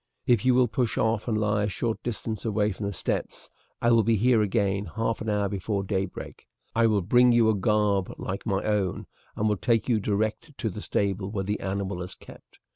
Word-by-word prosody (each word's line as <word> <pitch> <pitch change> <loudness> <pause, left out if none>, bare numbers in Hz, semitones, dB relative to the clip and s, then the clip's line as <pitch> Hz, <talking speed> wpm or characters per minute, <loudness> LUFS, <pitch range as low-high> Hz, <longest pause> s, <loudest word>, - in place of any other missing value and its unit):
If 120 -1 +3
you 130 -1 +5
will 125 -1 +4
push 115 +1 -1
off 110 0 +1
and 110 -2 +1
lie 105 -1 +1
a - - -1
short 115 +3 -2
distance 110 -2 -4
away 105 -1 +1
from 100 +1 -4
the - - -2
steps 95 - -4 0.3
I 120 - +4
will 115 -1 +6
be 115 +1 +2
here 115 +2 +3
again 100 -1 0
half 115 0 -1
an 110 - -3
hour 105 -1 +1
before 100 +1 -2
daybreak. 95 -1 -4 0.3
I 115 0 +4
will 105 -4 +1
bring 120 +6 +5
you 115 -2 +4
a - - 0
garb 100 -1 +1
like 95 +1 -4
my 100 -3 -1
own, 105 -4 -1 0.3
and 105 - 0
will 105 -1 +1
take 115 +2 +1
you 115 -4 +2
direct 110 +9 -2
to 110 - -2
the 105 - -7
stable 100 -2 -1
where 100 -2 -2
the 105 +2 -2
animal 95 -2 -3
is 90 - -6
kept. - - -16
105 Hz, 215 wpm, -26 LUFS, 100-115 Hz, 0.3 s, will